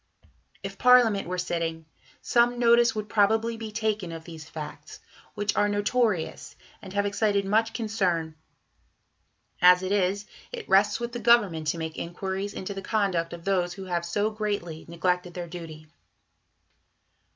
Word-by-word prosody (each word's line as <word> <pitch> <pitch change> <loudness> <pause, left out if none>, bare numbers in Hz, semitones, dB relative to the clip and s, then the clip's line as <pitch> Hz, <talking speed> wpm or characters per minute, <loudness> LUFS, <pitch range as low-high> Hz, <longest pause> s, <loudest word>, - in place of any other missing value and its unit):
If - - -7
Parliament 245 -6 +5
were 180 +1 -3
sitting, 165 -2 -3 0.4
some 240 0 +3
notice 235 -1 +4
would 215 -1 -3
probably 220 +2 +2
be 225 -1 -7
taken 215 -4 -2
of 165 -1 -7
these 160 -2 -10
facts, 150 -2 -8 0.4
which 205 0 -1
are 205 0 +2
notorious 205 -3 -1 0.3
and 195 -3 -10
have 200 0 +1
excited 205 -1 +1
much 220 +3 +2
concern; 190 -9 -1 1.3
as 180 +1 +7
it 185 - -2
is, 200 0 +1 0.3
it 485 -3 -7
rests 195 +4 +4
with 235 0 -4
the 240 - -5
Government 205 -10 +3
to 160 - 0
make 160 -1 -5
inquiries 190 +3 -4
into 190 +2 -5
the 195 - -6
conduct 190 -6 0
of 170 -1 -9
those 180 -3 +1
who 195 - -8
have 175 -2 -2
so 205 +5 -1
greatly 205 -7 -4
neglected 180 +1 -1
their 175 -1 -4
duty. 165 -3 -9
195 Hz, 150 wpm, -26 LUFS, 170-220 Hz, 1.3 s, as